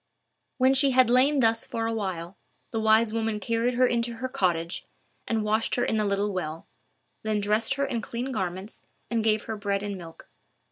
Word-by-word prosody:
When 260 0 +4
she 275 +1 +4
had 255 -2 +6
lain 270 +3 +4
thus 225 -1 +3
for 225 0 -3
a 225 - -1
while, 190 -4 -4 0.4
the 225 - -1
wise 220 0 +4
woman 225 -1 -1
carried 230 +3 0
her 255 +1 +4
into 235 -1 0
her 255 +3 -3
cottage, 175 -9 -1 0.4
and 225 -2 0
washed 215 +1 +1
her 245 - +1
in 220 - 0
the 215 - +1
little 200 0 0
well; 165 -3 -4 0.6
then 215 -1 -1
dressed 215 +5 +1
her 280 0 0
in 235 -4 -2
clean 245 +5 -4
garments, 190 -1 -4 0.3
and 230 -2 +1
gave 215 -1 +2
her 220 - -4
bread 200 -1 -2
and 200 -2 -4
milk. 165 -2 -12
220 Hz, 195 wpm, -26 LUFS, 200-235 Hz, 0.6 s, had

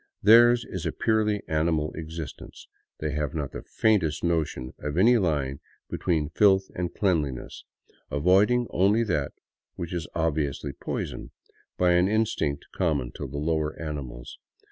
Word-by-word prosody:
Theirs 120 +3 +7
is - - -5
a - - 0
purely 105 -2 +1
animal 80 -1 0
existence. 80 -1 -8 0.3
They 75 0 -3
have 75 0 -2
not 75 -4 -3
the - - -7
faintest 90 -9 +1
notion 75 -7 -1
of 75 +2 -4
any 115 +5 +5
line 70 -7 -1 0.3
be - - -3
tween 80 -5 0
filth 95 +2 +3
and 90 -1 -3
cleanliness, 75 -10 -1 0.4
avoiding 95 +11 +3
only 100 +5 +3
that 75 -10 -1 0.4
which 85 +1 -5
is 85 -4 -3
obviously 75 -3 -1
poison, - - -5 0.5
by 90 -1 +3
an 90 +1 +4
instinct 105 -9 0
common 75 -9 0
to - - -6
the - - -7
lower 80 0 -1
animals. 70 -5 -6
80 Hz, 145 wpm, -26 LUFS, 75-95 Hz, 0.5 s, Theirs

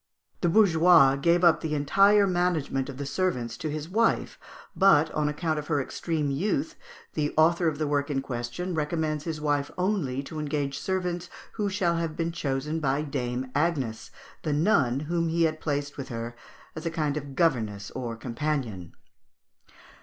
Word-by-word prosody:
The 175 - +1
bourgeois 170 -7 +6
gave 170 +5 +2
up 165 -2 +5
the 155 -2 -2
entire 195 +8 +4
management 175 -7 0
of 135 - -7
the 140 - -4
servants 135 -7 -1
to 155 - -4
his 155 +1 -4
wife; 225 +5 +1 0.4
but, 190 -5 +5
on 150 -1 0
account 155 +1 -1
of 150 - -7
her 150 -3 +1
extreme 150 +1 -2
youth, 160 +1 -1 0.4
the 150 -1 -1
author 170 +2 +4
of 155 -2 0
the 155 - -1
work 145 0 0
in 140 -2 0
question 120 +9 -4
recommends 155 -1 -1
his 160 -2 -3
wife 145 -1 0
only 180 -9 -1
to 155 +2 -7
engage 145 -2 -2
servants 180 -2 -2 0.2
who 210 -2 -2
shall 185 -4 0
have 165 -2 -2
been 165 0 -1
chosen 150 -1 -2
by 140 0 0
Dame 130 -3 -3
Agnes, 145 -7 -1 0.3
the 150 - -1
nun 140 - +2
whom 165 +2 -1
he 165 +1 +1
had 155 -1 0
placed 145 -1 -2
with 140 - -6
her 115 0 -5 0.4
as 160 - -6
a - - +1
kind 155 -3 -1
of 140 -2 -6
governess 110 - 0
or 120 -3 -4
companion. 115 - -3
150 Hz, 170 wpm, -27 LUFS, 140-170 Hz, 0.4 s, bourgeois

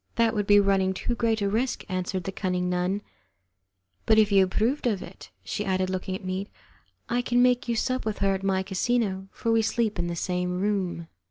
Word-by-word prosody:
"That 230 -1 +3
would 205 -2 -1
be 205 0 +7
running 195 -1 +2
too 240 - -2
great 225 -3 0
a - - +2
risk," 230 +6 -1
answered 185 -1 -2
the 195 - -4
cunning 180 -2 -1
nun, 180 +3 -1 1.0
"but 220 - +5
if 215 -1 +4
you 195 -1 +6
approve 225 +9 0
of 205 -5 -1
it," - - -12
she - - -3
added, 185 -1 0
looking 185 0 -3
at 190 - -8
me, 185 +2 -3 0.6
"I 245 +1 +1
can 245 0 +1
make 250 +1 +2
you 235 - 0
sup 255 +3 -1
with 215 -1 -2
her 195 -1 +2
at 190 - -3
my 190 -1 +1
casino, 195 0 -1
for 230 - -2
we 225 0 +4
sleep 220 -1 0
in 175 - 0
the 170 - -3
same 180 +1 -2
room." 190 -4 -1
195 Hz, 210 wpm, -26 LUFS, 185-225 Hz, 1.0 s, be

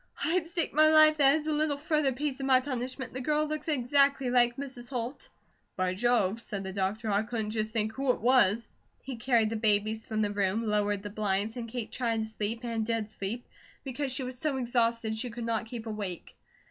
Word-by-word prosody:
"I'd 335 0 +1
stake 335 -1 -2
my 310 +1 +6
life 310 0 +7
that 280 -1 +5
as 310 -1 -2
a 310 - 0
little 300 -1 0
further 300 -2 +1
piece 280 +1 -3
of 270 - -2
my 260 -1 +6
punishment, 255 -1 -4
the 260 - -4
girl 300 +3 +1
looks 305 0 -4
exactly 275 -2 +2
like 240 -1 +4
Mrs. 260 -3 -7
Holt." 250 0 -5 0.5
"By 185 -1 0
Jove," 225 0 +1
said 200 -4 -5
the 190 0 -6
doctor, 205 +3 -1
"I 200 +1 +3
couldn't 220 -1 -3
just 215 0 -1
think 220 -1 0
who 270 +1 -2
it 250 - +2
was." 235 -3 +4 0.4
He 260 -2 -6
carried 230 -2 +2
the - - -1
babies 215 +1 +1
from 215 -1 0
the 205 - 0
room, 205 +2 0
lowered 205 -1 0
the 205 - -6
blinds, 210 +1 -1
and 235 -2 -5
Kate 235 -1 -5
tried 230 -3 -1
to - - -5
sleep, 220 +1 -4
and 230 -2 -1
did 220 -1 -2
sleep, 215 +4 -5 0.4
because 270 +1 -3
she 265 +1 -2
was 250 0 -5
so 295 -2 -1
exhausted 235 -2 +1
she 245 +3 -3
could 235 0 -6
not 230 0 -1
keep 230 -1 -7
awake. 205 -5 -6
235 Hz, 215 wpm, -29 LUFS, 215-270 Hz, 0.5 s, life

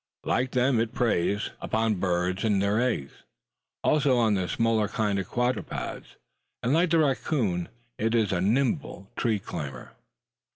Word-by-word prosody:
Like 130 +1 0
them 125 -1 +3
it 115 0 -1
preys 105 -3 +1
upon 110 -3 0
birds 90 +1 0
and 105 -3 +2
their 100 +3 +2
eggs, 110 - -1
as - - -22 0.6
also 140 -4 +3
on 115 -3 +3
the 95 -3 0
smaller 115 -1 +1
kinds 105 -1 0
of 95 - -4
quadrupeds, 125 +1 -3 0.5
and 125 - +2
like 170 +3 +3
the 165 - +3
racoon, 130 - 0 0.3
it 115 +2 +1
is 110 -3 +2
a 90 -2 0
nimble 120 - 0
tree 115 -3 +1
climber. 70 -9 -7
110 Hz, 155 wpm, -27 LUFS, 95-125 Hz, 0.6 s, them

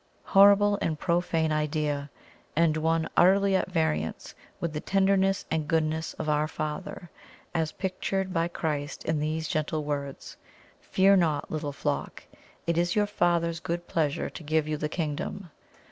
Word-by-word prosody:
Horrible 205 +1 +5
and 155 -2 -1
profane 170 -2 0
idea! 150 -1 -1 0.5
and 160 -1 +3
one 160 +1 +1
utterly 195 +2 +5
at 190 - 0
variance 80 - -1 0.3
with 170 -2 -3
the 150 - -2
tenderness 195 +1 +2
and 155 -2 0
goodness 160 0 0
of - - -5
"Our 150 0 +2
Father" 155 +3 -5 0.4
as 160 -2 -1
pictured 190 0 -2
by 165 -1 +1
Christ 150 -4 -3
in 160 -2 0
these 155 +1 -2
gentle 155 0 -1
words 140 -2 -5 0.4
"Fear 195 +1 +4
not, 155 -5 0
little 150 -2 -3
flock; - - -3 0.4
it 170 0 +1
is 175 0 +1
your 210 -1 +3
Father's 170 -4 +1
good 175 +1 -4
pleasure 150 -4 -1
to - - -9
give 155 0 +1
you 155 - -1
the 150 0 -3
Kingdom." 165 +3 -4
160 Hz, 150 wpm, -27 LUFS, 150-180 Hz, 0.5 s, Horrible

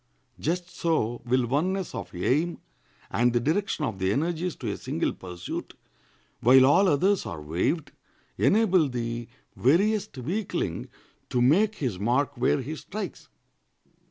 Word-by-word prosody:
Just 175 +3 -1
so 120 -9 0
will 125 +1 +2
oneness 180 +9 -1
of - - -5
aim 150 - +1 0.5
and 120 0 +2
the 120 - +3
direction 160 - 0
of 110 -7 -4
the 95 0 +1
energies 170 - -1
to 115 -6 -4
a - - -3
single - - -2
pursuit, 90 -1 -7 0.6
while 130 +2 +7
all 165 +9 +5
others 185 +5 +3
are 85 - -5
waived, 90 - -1 0.4
enable 190 -8 +3
the 120 -1 -3 0.3
veriest 190 - +2
weakling 170 - -3 0.4
to 125 - 0
make 190 - +4
his 120 - -3
mark 130 +7 +1
where 125 +3 +2
he 155 +5 -5
strikes. 210 +7 -7
140 Hz, 135 wpm, -27 LUFS, 120-175 Hz, 0.6 s, while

